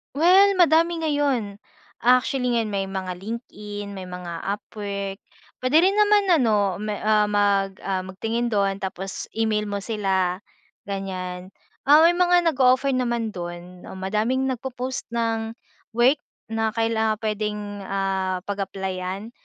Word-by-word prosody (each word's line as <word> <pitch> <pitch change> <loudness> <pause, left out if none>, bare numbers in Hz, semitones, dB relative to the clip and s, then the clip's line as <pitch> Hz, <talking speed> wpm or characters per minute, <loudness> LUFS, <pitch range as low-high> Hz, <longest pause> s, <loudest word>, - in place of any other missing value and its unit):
Well, 375 +5 +5
madami 335 0 +4
ngayon. 285 -9 0 0.5
Actually, 250 +1 +3
ngayon 230 -2 +1
may 195 -1 0
mga 190 -1 -4
LinkedIn, 205 -1 -7
may 190 - -6
mga 180 -2 -7
Upwork, 200 -1 -5 0.4
puwede 255 +4 +4
rin 380 +4 +3
naman 420 -1 +4
ano 215 - +3
me 210 -1 -2
ah, 215 0 +3
mag 200 -1 +2
ah, 190 -1 -2
magtingin 225 +6 -2
doon 200 -2 +1
tapos 190 0 -5
e-mail 220 -1 0
mo 200 0 -2
sila, 190 -3 -1 0.4
ganyan. 185 -2 -5 0.4
Ah, 300 +3 +8
may 335 - +7
mga 355 -1 +4
nag-o-offer 260 0 +3
naman 235 -3 -1
doon 175 0 -8
oh, - - -8
madaming 215 +8 0
nagpo-post 255 +1 -4
ng 225 -1 -1 0.4
work, 255 +5 +4 0.3
na 225 -1 0
kailang 225 -1 +1
puwedeng 210 -1 -3
ah, 190 -2 -1
pag-applyan. 195 +1 -4
210 Hz, 130 wpm, -24 LUFS, 195-250 Hz, 0.5 s, Ah